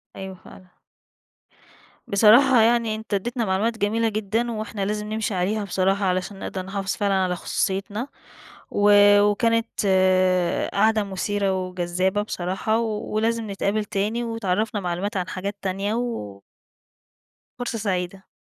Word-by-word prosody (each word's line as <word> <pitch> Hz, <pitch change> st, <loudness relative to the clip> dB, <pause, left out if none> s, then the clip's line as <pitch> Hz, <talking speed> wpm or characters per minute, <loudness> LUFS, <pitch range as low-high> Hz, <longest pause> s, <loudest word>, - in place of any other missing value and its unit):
أيوه، 190 Hz, 0 st, -7 dB
فعلًا. 185 Hz, 0 st, -17 dB, 1.3 s
بصراحة 235 Hz, +4 st, +6 dB
يعني 230 Hz, -1 st, +2 dB
أنت 220 Hz, -1 st, -7 dB
أدِّيتنا 235 Hz, +4 st, -1 dB
معلومات 210 Hz, +4 st, 0 dB
جميلة 225 Hz, +2 st, +1 dB
جدًا، 220 Hz, +3 st, -1 dB
وإحنا 215 Hz, -2 st, -4 dB
لازم 210 Hz, +1 st, -3 dB
نمشي 220 Hz, -1 st, -2 dB
عليها 195 Hz, +4 st, 0 dB
بصراحة، 195 Hz, +1 st, 0 dB
علشان 185 Hz, +2 st, -1 dB
نقدر 190 Hz, -, -4 dB
نحافظ 195 Hz, 0 st, -3 dB
فعلًا 200 Hz, -2 st, 0 dB
على 185 Hz, -2 st, +1 dB
خصوصيِّتنا، 200 Hz, +7 st, -2 dB, 0.6 s
و 205 Hz, 0 st, +3 dB, 0.3 s
وكانت 230 Hz, +3 st, +2 dB, 1.1 s
قعدة 215 Hz, +1 st, +3 dB
مُثيرة 195 Hz, -1 st, -1 dB
وجذّابة 185 Hz, +2 st, -1 dB
بصراحة، 195 Hz, +2 st, -1 dB
ولازم 220 Hz, 0 st, -1 dB
نتقابل 200 Hz, +2 st, -1 dB
تاني، 210 Hz, +4 st, -1 dB
وتِعرَّفنا 215 Hz, -2 st, -1 dB
معلومات 185 Hz, +4 st, -2 dB
عن 180 Hz, -1 st, -2 dB
حاجات 200 Hz, +2 st, -4 dB
تانية 195 Hz, +2 st, -1 dB
و 165 Hz, -, -4 dB, 1.2 s
فُرصة 245 Hz, -2 st, -3 dB
سعيدة. 190 Hz, -2 st, -3 dB
205 Hz, 120 wpm, -23 LUFS, 190-220 Hz, 1.3 s, بصراحة